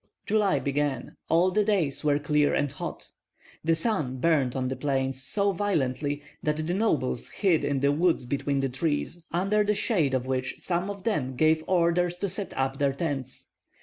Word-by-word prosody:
July 205 -5 +2
began; 140 -1 -2
all 175 +3 +4
the 210 +3 +2
days 185 -11 0
were 145 -1 +3
clear 150 0 +2
and 145 -2 0
hot. - - -7 0.5
The 165 +1 +3
sun 160 - -1
burned 135 -3 +2
on 130 -1 -1
the 130 - -2
plains 135 -1 -1
so 200 +9 +1
violently 145 -7 -1 0.2
that 150 0 0
the 155 +3 -1
nobles 160 - 0
hid 185 -6 +1
in 140 -2 0
the 140 0 +3
woods 160 -2 +2
between 140 +2 -1
the 135 - 0
trees, 155 +5 -2
under 195 +5 +2
the 210 0 +1
shade 170 - +1
of 130 -1 -1
which 130 0 -2
some 180 +2 -2
of 200 -2 -6
them 140 - -1
gave 155 +3 +3
orders 175 0 +2
to 200 +2 -2
set 195 +2 -4
up 135 0 -1
their 140 -1 +2
tents. 140 -4 -4
150 Hz, 180 wpm, -27 LUFS, 135-180 Hz, 0.5 s, all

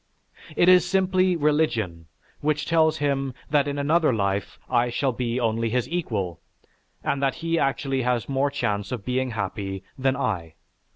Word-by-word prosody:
It 175 - +4
is 180 -2 +7
simply 185 0 +2
religion, 130 - 0 0.3
which 150 0 0
tells 160 -1 +3
him 135 -3 -1 0.2
that 145 -1 +3
in 145 0 -2
another 155 +2 +3
life 100 -3 -1
I 120 -1 +2
shall 135 +3 0
be 120 0 -2
only 115 -1 0
his 125 +1 0
equal, 110 - -3 0.6
and 140 - -1
that 135 -1 +1
he 165 0 -1
actually 135 -1 0
has 125 -2 0
more 140 +1 +1
chance 105 -7 -2
of 120 -6 -4
being 130 +1 0
happy 100 -3 -4 0.2
than 135 0 +2
I. 85 - -2
135 Hz, 160 wpm, -25 LUFS, 115-150 Hz, 0.6 s, is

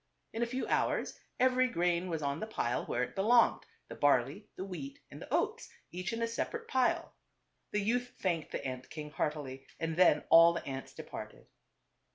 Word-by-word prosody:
In 225 - -3
a 235 - +2
few 255 +2 -2
hours - - 0 0.2
every 255 0 +4
grain 175 -3 0
was 160 -3 -2
on 140 +1 -1
the 220 - -4
pile 125 - -1
where 125 - 0
it - - -5
belonged; 230 +5 +4 0.2
the - - -8
barley, 145 - +2
the 190 - -5
wheat 275 +10 -7
and - - -10
the - - -10
oats, 455 +2 0 0.2
each 180 +4 -3
in 230 0 -2
a - - +1
separate 455 - -3
pile. 260 -1 +1 0.6
The 210 - 0
youth 245 +4 0
thanked 170 -5 -1
the - - -4
ant 130 -1 -5
king 150 -1 -7
heartily, 140 -4 -3
and 165 -1 -2
then 175 -5 +5
all 165 +1 +9
the 170 - -4
ants 135 -1 -6
departed. - - -8
180 Hz, 190 wpm, -32 LUFS, 150-235 Hz, 0.6 s, all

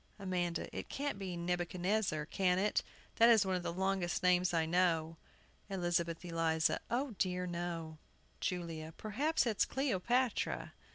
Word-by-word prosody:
AMANDA. 180 -3 -2
It - - -5
can't 280 -7 -3
be 185 -3 -4
Nebuchadnezzar, 175 0 0
can 180 +2 +1
it? 205 +2 +2 0.4
that 230 +1 +7
is 220 -4 +6
one 190 - 0
of 180 - -1
the 175 - -3
longest 190 0 -1
names 180 0 +4
I 165 -2 +2
know. 165 -1 +1 0.5
ELIZABETH 175 -2 -1
ELIZA. 165 -2 +1
O 255 +3 0
dear, 180 -1 0
no! 170 -3 -4 0.4
JULIA. 165 -3 -3
Perhaps 275 +10 0
it's 220 -4 +2
Cleopatra. 250 -1 0
180 Hz, 135 wpm, -35 LUFS, 170-200 Hz, 0.5 s, that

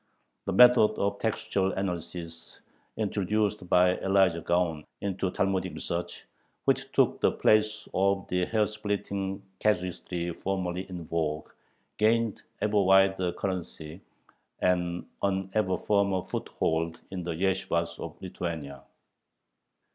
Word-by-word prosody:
The 95 - -1
method 125 +1 +7
of 100 0 0
textual 100 -3 0
analysis 85 -3 -5 0.4
introduced 105 -2 0
by 90 0 +4
Elijah 95 -3 +3
Gaon 85 -3 0 0.2
into 95 -1 -1
Talmudic 95 0 -1
research, 85 +1 -4 0.4
which - - +1
took - - +2
the - - +4
place 110 0 +2
of 95 0 +1
the 90 0 +1
hair 110 +1 +2
splitting 100 -2 -3 0.2
casuistry 90 -3 -1
formerly 95 0 -3
in 90 -3 -6
vogue, 75 -2 -2 0.5
gained 115 0 +2 0.2
ever 105 -1 +3
wider 95 -1 +4
currency 90 -3 -5 0.6
and 90 -1 0 0.2
an 95 -1 0
ever 105 -4 +1
firmer 100 -3 +1
foothold 80 +1 -2
in 95 -2 -4
the 85 -1 -3
yeshibahs 85 -2 0
of 85 -1 -7
Lithuania. 80 -7 -5
95 Hz, 115 wpm, -28 LUFS, 85-100 Hz, 0.6 s, method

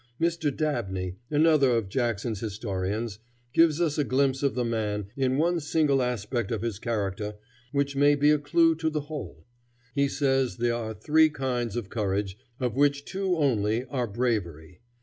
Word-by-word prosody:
Dr. 170 -2 +1
Dabney, 95 - -2
another 150 -2 +4
of 110 -4 -2
Jackson's 115 -1 -1
historians, 105 0 -3 0.3
gives 165 -1 +4
us 160 -4 +1
a - - +3
glimpse 135 0 +1
of 140 -1 +1
the 125 -1 0
man, 105 -3 -1
in 130 -1 +1
one 170 +3 +2
single 150 -3 +2
aspect 120 -2 -2
of 115 -1 -2
his 110 -4 -3
character, 105 -2 -2 0.4
which 140 0 0
may 145 +1 +5
be 145 +1 +4
a 150 - +3
clew 165 +3 +3
to 160 -1 0
the 155 -1 -2
whole. 145 0 -8 0.5
He 140 -1 +2
says 135 -3 0
there 120 0 +1
are 110 -2 -4
three 155 +4 +4
kinds 125 -6 -2
of 115 -5 -4
courage, 100 -3 -1 0.2
of 125 -3 -1
which 140 0 +2
two 190 -1 -1
only 115 -5 +1
are 125 -4 -1
bravery. 100 -7 -2
125 Hz, 170 wpm, -27 LUFS, 110-145 Hz, 0.5 s, may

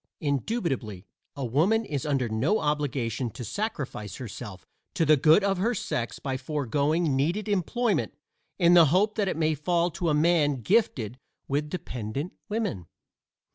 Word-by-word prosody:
Indubitably 140 - -2 0.3
a 140 - -3
woman 180 - +2
is 145 -4 -3
under 135 -4 +1
no 115 - +1
obligation 140 - -1
to 120 +2 -8
sacrifice 140 - -4
herself 100 -5 -8 0.3
to 165 - +2
the 155 0 +6
good 155 +7 +5
of 195 -2 +1
her 230 +5 +1
sex 120 - -3
by 135 -2 -3
foregoing 145 +3 0
needed 170 +11 0
employment 210 +4 0 0.4
in 175 -2 +5
the 170 -2 +8
hope 190 +8 +2
that 210 -2 0
it 185 - -1
may 160 -1 +2
fall 170 +4 0
to 170 +1 -2
a 150 - +2
man 150 -5 +2
gifted 130 - +1 0.3
with 145 +2 -1
dependent 135 - -5 0.2
women. 205 - -2
150 Hz, 150 wpm, -27 LUFS, 130-180 Hz, 0.4 s, the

